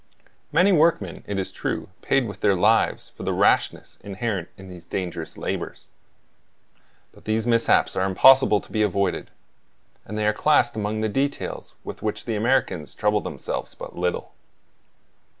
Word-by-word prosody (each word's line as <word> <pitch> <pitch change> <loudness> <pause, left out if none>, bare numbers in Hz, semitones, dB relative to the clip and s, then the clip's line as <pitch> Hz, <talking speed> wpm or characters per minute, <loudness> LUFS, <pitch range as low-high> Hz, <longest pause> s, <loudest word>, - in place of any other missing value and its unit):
Many 195 +3 +4
workmen, 160 - +2
it 100 - -3
is 95 - -3
true, - - -3
paid 135 -3 +1
with 100 - -8
their 100 -2 +3
lives 90 - +2
for - - -14
the - - -1
rashness - - +1
inherent 100 -3 -3
in 95 - -12
these 90 -2 -12
dangerous 90 -4 -5
labors; - - -5 1.2
but - - -20
these 110 +1 0
mishaps 115 -1 +2
are 95 +1 +1
impossible 130 +3 +6
to - - -17
be 110 - 0
avoided, 100 -2 0 0.7
and 105 - -7
they 105 - 0
are 105 - +3
classed 120 -1 +3
among 110 0 -2
the 110 - +1
details 135 +7 -3
with - - -8
which 105 -1 -3
the 115 - -2
Americans 110 - 0
trouble 105 0 +1
themselves - - -5
but - - -9
little. 90 0 -2
105 Hz, 155 wpm, -24 LUFS, 95-120 Hz, 1.2 s, impossible